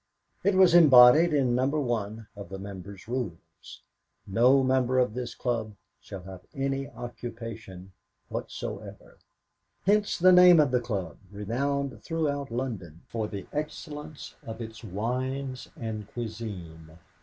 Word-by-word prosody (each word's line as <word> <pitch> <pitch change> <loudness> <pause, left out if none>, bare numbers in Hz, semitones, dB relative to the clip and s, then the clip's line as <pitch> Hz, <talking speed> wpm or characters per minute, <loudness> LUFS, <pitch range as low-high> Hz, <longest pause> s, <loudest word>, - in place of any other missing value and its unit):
It 200 - +3
was 185 -2 +6
embodied 150 0 +8
in 135 -5 +2
No. 130 +2 +2
1 115 -7 -2
of 100 -3 -9
the 95 - -6
members' 100 0 -9
rules: 95 -7 -6 0.4
"No 125 +7 +4
member 130 -1 +2
of 125 -4 +2
this 125 0 -5
club 115 -4 -2 0.3
shall 95 -2 -9
have 95 -1 -10
any 135 0 -2
occupation 115 -5 -8 0.4
whatsoever." - - -7 0.7
Hence 205 +1 +2
the 185 +1 +6
name 180 -2 +8
of 145 -4 +3
a 125 - +4
club 105 -7 -4
renowned 135 +7 -2
throughout 145 -4 -2
London 110 -10 -5
for 110 -2 -2
the 100 -3 -7
excellence 150 0 -6
of 115 0 -8
its 110 -1 -8
wines 125 +6 -3
and 110 -4 -5
cuisine. 90 -9 -7
120 Hz, 130 wpm, -28 LUFS, 100-140 Hz, 0.7 s, embodied